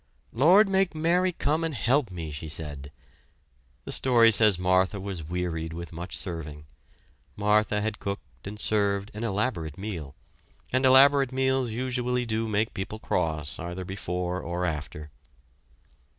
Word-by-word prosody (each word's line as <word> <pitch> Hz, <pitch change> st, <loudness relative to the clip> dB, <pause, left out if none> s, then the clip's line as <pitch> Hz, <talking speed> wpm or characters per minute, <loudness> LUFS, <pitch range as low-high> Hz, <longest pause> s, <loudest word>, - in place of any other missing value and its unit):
"Lord, 180 Hz, -, +6 dB
make 190 Hz, -3 st, +1 dB
Mary 175 Hz, +4 st, +2 dB
come 155 Hz, -1 st, -1 dB
and 160 Hz, -3 st, -2 dB
help 125 Hz, 0 st, +1 dB
me!" 85 Hz, -4 st, -6 dB
she 75 Hz, +2 st, -6 dB
said. 75 Hz, -3 st, -4 dB, 0.9 s
The -, -, -6 dB
story 120 Hz, -3 st, +4 dB
says 105 Hz, -3 st, +6 dB
Martha 95 Hz, +2 st, +1 dB
was 95 Hz, -4 st, -5 dB
wearied 80 Hz, -1 st, -3 dB
with 85 Hz, 0 st, -8 dB
much 85 Hz, +3 st, -5 dB
serving. 75 Hz, -5 st, -5 dB, 0.7 s
Martha 105 Hz, 0 st, +2 dB
had 110 Hz, 0 st, -3 dB
cooked 75 Hz, -8 st, -7 dB
and 105 Hz, +1 st, -7 dB
served 100 Hz, -1 st, 0 dB
an 105 Hz, +2 st, -6 dB
elaborate 100 Hz, -, -2 dB
meal, 90 Hz, -9 st, -6 dB, 0.6 s
and 130 Hz, +1 st, +3 dB
elaborate 135 Hz, 0 st, +6 dB
meals 130 Hz, -1 st, 0 dB
usually 125 Hz, +1 st, -2 dB
do 115 Hz, 0 st, -1 dB
make 110 Hz, +1 st, 0 dB
people 100 Hz, +3 st, -5 dB
cross 80 Hz, -8 st, -2 dB
either 90 Hz, +2 st, -5 dB
before 90 Hz, -1 st, -3 dB
or 85 Hz, +1 st, -3 dB
after. 75 Hz, -2 st, -5 dB
100 Hz, 140 wpm, -27 LUFS, 85-125 Hz, 0.9 s, Lord